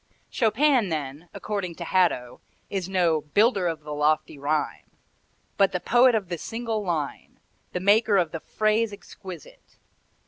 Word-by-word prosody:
Chopin 240 0 +2
then, 150 +1 -5
according 195 -5 -4
to 170 - -6
Hadow, 170 -9 +1 0.3
is 190 -2 -3
no 175 -5 +2
"builder 200 - +2
of 165 -2 -3
the 150 0 -7
lofty 150 0 0
rhyme," 150 +2 -2 0.7
but 195 -1 +3
the 180 - 0
poet 245 +4 +4
of 205 -4 -1
the 170 -1 -4
single 225 0 -3
line, 160 -6 -4 0.3
the 180 - -1
maker 205 +2 +4
of 170 -4 +1
the 165 - -4
phrase 215 +5 0
exquisite. 185 -4 -12
185 Hz, 145 wpm, -25 LUFS, 155-215 Hz, 0.7 s, poet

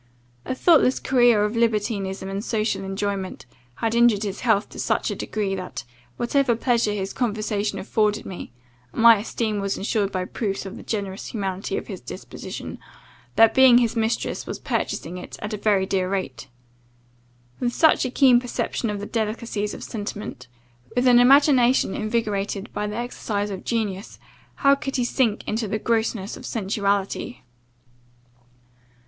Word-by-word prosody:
A 260 - -2
thoughtless 285 -3 +4
career 240 -5 +4
of 210 +2 -3
libertinism 210 -4 0
and 195 +1 -4
social 215 -3 -1
enjoyment, 195 -2 -3 0.3
had 225 - -1
injured 235 -3 +4
his 200 -1 -4
health 220 -4 +2
to - - -10
such - - 0
a - - -3
degree, 205 -3 -2
that, 180 -9 -5 0.3
whatever 245 0 +2
pleasure 235 -2 +1
his 195 -1 -3
conversation 215 -3 -1
afforded 210 +2 0
me 185 - -7 0.4
(and 225 - -2
my 230 -1 +9
esteem 215 0 -2
was 200 0 -2
ensured 200 0 0
by 185 -1 -2
proofs 200 -1 -3
of 195 - -7
the - - -9
generous 200 -3 -4
humanity 195 -2 -3
of - - -4
his - - -7
disposition), - - -8 0.6
the 225 0 +7
being 260 -2 +7
his 235 -2 +2
mistress 225 0 -1
was - - -4
purchasing 175 +3 -3
it - - -9
at 215 0 -5
a - - -2
very 205 -2 +2
dear 190 -1 0
rate. 135 -11 -3 1.1
With 245 -1 0
such 315 +6 +4
a 255 - -1
keen 255 -1 +5
perception 245 -1 -3
of 205 -1 -3
the - - -4
delicacies 215 -1 -2
of - - -9
sentiment, 205 - -6 0.5
with 245 +1 +2
an 245 -1 +7
imagination 260 -3 +5
invigorated 215 -2 -2
by 210 - -2
the 210 - -5
exercise 210 -4 -3
of 190 - -6
genius, 210 -3 -3 0.5
how 275 - +8
could 275 -1 -3
he 250 -2 +1
sink 235 -4 0
into 220 +1 -1
the 215 - -1
grossness 220 -2 -1
of - - -11
sensuality! 200 +2 -2
215 Hz, 160 wpm, -23 LUFS, 200-235 Hz, 1.1 s, my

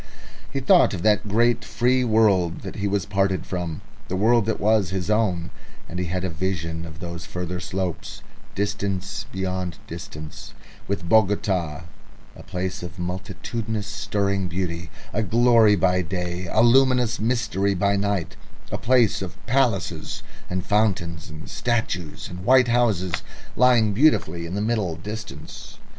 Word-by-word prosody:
He 135 - -1
thought 140 - +5
of 85 - -6
that 105 0 +3
great 120 +4 +2
free 125 +1 +1
world 105 -7 +2
he 100 0 -2
was 100 -3 0
parted 95 -1 0
from, 90 -1 -4 0.3
the 95 - -2
world 110 +3 +3
that 110 - 0
was 105 -3 +3
his 95 +2 -2
own, 95 -6 +1 0.4
and 90 - -5
he 90 - -1
had 90 +2 -2
a 95 - -1
vision 80 -1 -3
of 80 -1 -10
those 85 -1 -6
further 90 0 -4
slopes, 95 -2 -4 0.3
distance 100 0 -2
beyond 95 -2 -3
distance, 75 0 -9 0.3
with 100 -3 -3
Bogota, 95 -7 +2 0.5
a - - -11
place 90 +1 -4
of 90 0 -8
multitudinous 100 +4 -4
stirring 100 -3 -1
beauty, 85 -2 -3 0.2
a 110 - +1
glory 115 -1 +5
by 90 0 +2
day, 90 +1 -3
a 110 - +4
luminous 125 -2 +4
mystery 105 -4 0
by 100 +2 +2
night, 100 -4 -1 0.4
a - - -2
place 120 -4 +3
of 95 0 -6
palaces 120 -6 0 0.3
and 90 0 -2
fountains 95 -6 0
and 75 0 -9
statues 110 -9 -2
and 90 +1 -8
white 130 +2 +5
houses, 105 -8 +1 0.3
lying 120 -4 +4
beautifully 90 - +2
in 90 - -5
the 100 - -1
middle 105 -6 0
distance. 85 -5 -8
100 Hz, 145 wpm, -24 LUFS, 90-110 Hz, 0.5 s, thought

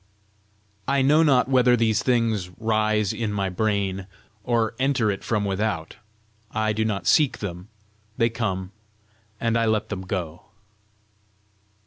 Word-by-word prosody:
I 135 0 +2
know 150 +4 +5
not 135 -6 +4
whether 125 -2 +4
these 110 -2 +2
things 115 -7 +1
rise 110 -2 +1
in 115 -3 -2
my 100 -2 -1
brain, 95 -1 -1 0.4
or 115 -1 0
enter 130 -5 +2
it 100 - -6
from 105 -2 0
without. 95 -4 -2 0.5
I 110 0 0
do 110 +1 0
not 100 -5 -2
seek 145 - +3
them; 90 -2 -6 0.5
they 115 -2 +2
come, 95 -5 -3 0.7
and 115 -1 0
I 115 0 +2
let 110 0 0
them 100 -3 -4
go. 90 -3 -5
110 Hz, 135 wpm, -24 LUFS, 100-115 Hz, 0.7 s, know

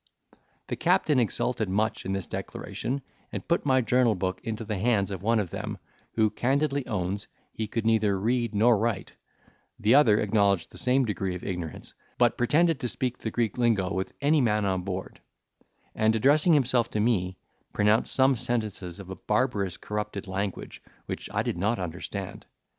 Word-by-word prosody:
The - - -3
captain 150 -4 +2
exulted 115 -1 0
much 105 +1 -1
in 95 - -1
this 95 -2 -2
declaration, 135 +3 -4 0.3
and - - -6
put 170 -3 +1
my 130 -1 +4
journal 125 -2 +3
book 95 -1 -2
into 110 0 -4
the 105 -3 -3
hands 100 -3 +1
of 95 -2 -5
one 115 +3 +2
of 100 -6 -1
them, - - -4 0.4
who 110 -2 +3
candidly 140 +1 0
owned 100 -2 -2 0.3
he 110 - -3
could 115 +1 -3
neither 110 -3 +2
read 115 +1 0
nor 110 +1 +4
write; 110 -3 -2 0.6
the 110 +3 +3
other 115 -7 +6
acknowledged 100 -4 +2
the - - -7
same 130 +1 +3
degree 95 -4 -2
of 90 - -8
ignorance, 90 -5 -5 0.2
but - - +3
pretended 155 +5 +2
to 125 - -2
speak 125 +1 -2
the 110 - -3
Greek 115 +1 -1
lingo 105 -6 +2
with 95 0 -3
any 150 +1 +4
man 105 -4 +2
on 95 -2 0
board; 95 0 -6 0.7
and, 110 +1 +2
addressing 145 +8 +4
himself 125 -4 +2
to 110 - -2
me, 95 -5 +1 0.3
pronounced 105 +2 +2
some 135 0 +4
sentences 110 -7 -2
of 95 -1 -9
a - - -5
barbarous 105 -4 0
corrupted 105 -1 -4
language, 95 0 -4 0.2
which - - -6
I - - 0
did 85 - -3
not 105 +5 +1
understand. 90 -4 -6
110 Hz, 175 wpm, -27 LUFS, 100-125 Hz, 0.7 s, other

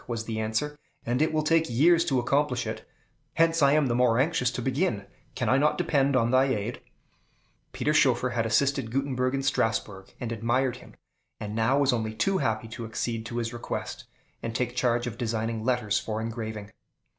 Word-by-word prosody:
was 115 -2 -3
the 110 -1 -3
answer, 110 +8 -2 0.3
"and 120 +4 0
it 155 - +2
will 155 -1 0
take 165 0 +2
years 165 +8 +4
to 145 -6 0
accomplish 125 0 +1
it; - - -6 0.5
hence 165 0 +3
I 140 0 +5
am 150 -1 +3
the 120 - 0
more 120 -1 +3
anxious 135 -2 +2
to 125 - -5
begin. 130 - 0 0.3
Can - - -2
I 130 - +4
not 150 +1 +2
depend 140 -5 +2
on 120 -2 +2
thy 130 +1 +5
aid?" 120 -3 -2 0.9
Peter 150 - 0
Schoeffer 125 -4 +3
had 120 -1 0
assisted 130 +2 +1
Gutenberg 130 0 -1
in 135 - -2
Strasbourg, 110 -7 -1
and 120 -2 -4
admired 120 +3 0
him, - - -15 0.4
and 105 0 -5
now 115 +5 +2
was 140 -2 +3
only 110 -2 -2
too 190 - +1
happy 110 0 -1
to 115 +1 -6
accede 115 0 -3
to 120 - -5
his 115 -1 -2
request, 120 - -5 0.4
and 115 -1 -5
take 125 0 -1
charge 120 -2 +1
of 115 -2 -6
designing 115 -1 -2
letters 120 -4 +1
for 110 -1 -4
engraving. 110 -2 -5
125 Hz, 190 wpm, -27 LUFS, 115-140 Hz, 0.9 s, I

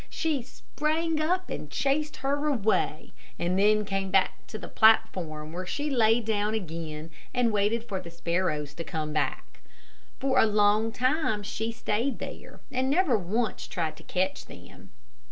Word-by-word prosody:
She 315 -5 -1
sprang 310 +5 -2
up 365 +4 0
and 150 - -5
chased 275 - 0
her 285 +2 +1
away, 225 -7 0 0.2
and 180 +2 0
then 210 +1 +4
came 195 -1 -2
back 190 0 +1
to 215 - -6
the - - -8
platform, 165 -8 +3
where 180 +1 -5
she 290 +8 -2
lay 225 -2 +4
down 215 -1 0
again 165 -4 -5 0.2
and 245 -2 +3
waited 210 +3 +1
for 195 -4 -2
the 170 - -9
sparrows 170 -3 -1
to 165 - -6
come 155 -2 -3
back. 155 - -2 0.6
For 265 -1 +2
a - - +6
long 210 +1 +3
time 255 -3 +1
she 220 +2 -3
stayed 235 +3 -1
there, - - -8
and 260 0 0
never 300 -3 +3
once 215 +4 -1
tried 160 -3 -2
to - - -13
catch 185 +1 -1
them. - - -13
215 Hz, 160 wpm, -28 LUFS, 180-260 Hz, 0.6 s, a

